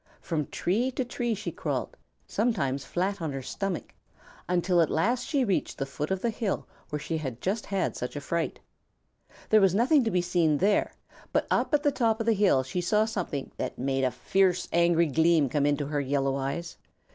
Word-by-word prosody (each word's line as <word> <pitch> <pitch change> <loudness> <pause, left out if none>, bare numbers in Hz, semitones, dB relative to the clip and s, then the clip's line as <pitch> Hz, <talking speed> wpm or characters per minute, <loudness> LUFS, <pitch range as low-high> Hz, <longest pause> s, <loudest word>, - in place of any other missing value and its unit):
From 155 -4 -2
tree 225 +9 0
to 260 - -1
tree 240 -1 -2
she 205 +1 -5
crawled, - - -3 0.3
sometimes 140 - 0
flat 190 +2 -1
on 160 -3 -2
her 135 -1 -5
stomach, 195 +7 -4 0.6
until 180 0 +3
at 160 - +2
last 235 +10 +1
she 275 -4 +1
reached 195 -4 -1
the 135 - -2
foot 140 +2 -4
of 190 -1 -2
the 235 - +1
hill 215 -3 -2 0.2
where 150 - -2
she 160 +2 -3
had 130 -6 -5
just 205 - -2
had 195 -2 -1
such 125 - -5
a - - -2
fright. 170 +3 -2 0.9
There 215 -1 +6
was 190 -1 +4
nothing 260 +6 +4
to 225 - 0
be 180 -3 +1
seen 170 -4 +2
there, 200 +6 +2 0.4
but - - +1
up - - +2
at 290 - 0
the 290 - +3
top 230 -4 +1
of 225 - -1
the 230 - +4
hill 195 -10 +3
she 155 +7 -3
saw 210 +5 +2
something 180 - -4
that - - -4
made 135 +1 0
a 130 - +3
fierce, 180 +8 +1
angry 170 0 +4
gleam 160 -1 +3
come 145 +2 +1
into 145 0 +1
her 145 0 -1
yellow 135 0 0
eyes. 140 +5 -4
175 Hz, 205 wpm, -28 LUFS, 145-210 Hz, 0.9 s, There